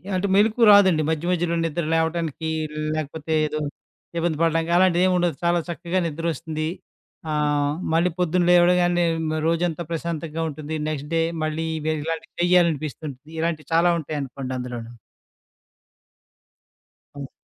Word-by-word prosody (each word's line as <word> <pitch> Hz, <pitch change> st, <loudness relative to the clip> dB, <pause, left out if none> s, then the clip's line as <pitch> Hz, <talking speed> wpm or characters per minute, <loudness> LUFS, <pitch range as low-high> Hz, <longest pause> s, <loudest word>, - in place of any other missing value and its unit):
అంటే, 185 Hz, +2 st, 0 dB
మెలుకువ 220 Hz, +3 st, +4 dB
రాదండి, 190 Hz, -6 st, +6 dB
మధ్య 160 Hz, +1 st, -1 dB
మధ్యలో 175 Hz, -1 st, 0 dB
నిద్ర 165 Hz, +1 st, -2 dB
లేవటానికి, 160 Hz, -1 st, -1 dB, 0.5 s
లేకపోతే 155 Hz, +1 st, -4 dB
ఏదో 155 Hz, -, -3 dB, 0.6 s
ఇబ్బంది 165 Hz, -2 st, 0 dB
పడడానికి 165 Hz, 0 st, +1 dB
అలాంటిదేవుండదు. 180 Hz, -2 st, +3 dB
చాలా 170 Hz, 0 st, +3 dB
చక్కగా 175 Hz, +2 st, -2 dB
నిద్రొస్తుది. 160 Hz, 0 st, -3 dB, 0.6 s
ఆహ్, 145 Hz, -1 st, +1 dB, 0.2 s
మళ్ళీ 170 Hz, +2 st, +3 dB
పొద్దున 180 Hz, 0 st, +2 dB
లేవడగానే 175 Hz, 0 st, +4 dB, 0.2 s
మ్ -, -, -1 dB
రోజంతా 170 Hz, 0 st, 0 dB
ప్రశాంతంగా 165 Hz, -1 st, -3 dB
ఉంటుంది. 155 Hz, +1 st, -5 dB
నెక్స్ట్ 150 Hz, -1 st, -5 dB
డే 165 Hz, -, +3 dB, 0.2 s
మళ్ళీ 155 Hz, +1 st, -2 dB
ఇవే 155 Hz, +1 st, -1 dB
ఇలాంటియి 165 Hz, +1 st, -5 dB
చెయ్యాలనిపిస్తుంటది. 155 Hz, -5 st, 0 dB
ఇలాంటియి 160 Hz, -2 st, -2 dB
చాలా 175 Hz, +1 st, +4 dB
ఉంటాయనుకోండి 140 Hz, -4 st, -5 dB
అందులోను. 120 Hz, -2 st, -6 dB, 2.3 s
హ్మ్. 140 Hz, -2 st, -6 dB
165 Hz, 115 wpm, -23 LUFS, 155-175 Hz, 2.3 s, రాదండి